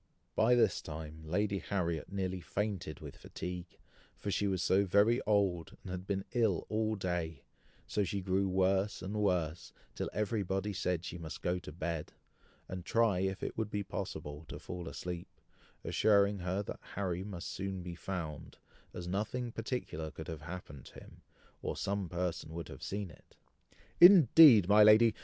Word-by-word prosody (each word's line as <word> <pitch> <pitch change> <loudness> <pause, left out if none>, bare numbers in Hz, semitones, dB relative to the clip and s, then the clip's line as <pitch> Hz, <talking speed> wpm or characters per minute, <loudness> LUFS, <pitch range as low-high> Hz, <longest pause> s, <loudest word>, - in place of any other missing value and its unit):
By 120 +3 +5
this 115 -5 +3
time 80 0 -7
Lady 100 +4 0
Harriet 85 -5 -2
nearly 95 -2 -2
fainted 95 -6 -3
with - - -9
fatigue, 90 -1 -7 0.4
for 100 - -3
she 100 - +1
was 95 -2 0
so 95 +2 +4
very 100 +6 +4
old, 95 -6 +1
and 95 - -7
had 90 +1 -5
been 95 -1 -1
ill 110 -8 +2
all 110 0 0
day; 85 -6 -3 0.4
so 105 - 0
she 100 +1 -2
grew 95 +1 +1
worse 95 +2 +1
and 100 +3 -3
worse, 85 -4 0 0.2
till - - -3
everybody 100 -1 -1
said 90 -2 -1
she 85 - -6
must 80 -2 -7
go 90 +1 0
to 90 - -9
bed, 80 0 -4 0.5
and 90 -1 -6
try 115 -2 +2
if 95 0 -2
it - - -3
would 110 -2 -2
be 105 -1 -2
possible 75 -5 -5
to - - -7
fall 90 -2 -7
asleep, 90 -1 -5 0.6
assuring 100 -1 +3
her 90 +3 -1
that - - -7 0.2
Harry 95 -2 -2
must 95 -4 -6
soon 95 -1 -4
be 90 -1 -6
found, 85 -3 -6 0.4
as 90 -1 -5
nothing 110 +6 -2
particular 115 -10 -4
could 80 0 -9
have 80 -2 -6
happened 75 -5 -8
to - - -14
him, - - -13 0.4
or - - -3
some 100 -2 -2
person 85 -3 -3
would 85 -3 -5
have - - -10
seen 100 -2 -4
it. - - -20 0.6
"Indeed, 160 - +9
my 105 +2 +7
lady! 110 +1 +7
95 Hz, 170 wpm, -33 LUFS, 85-105 Hz, 0.6 s, Indeed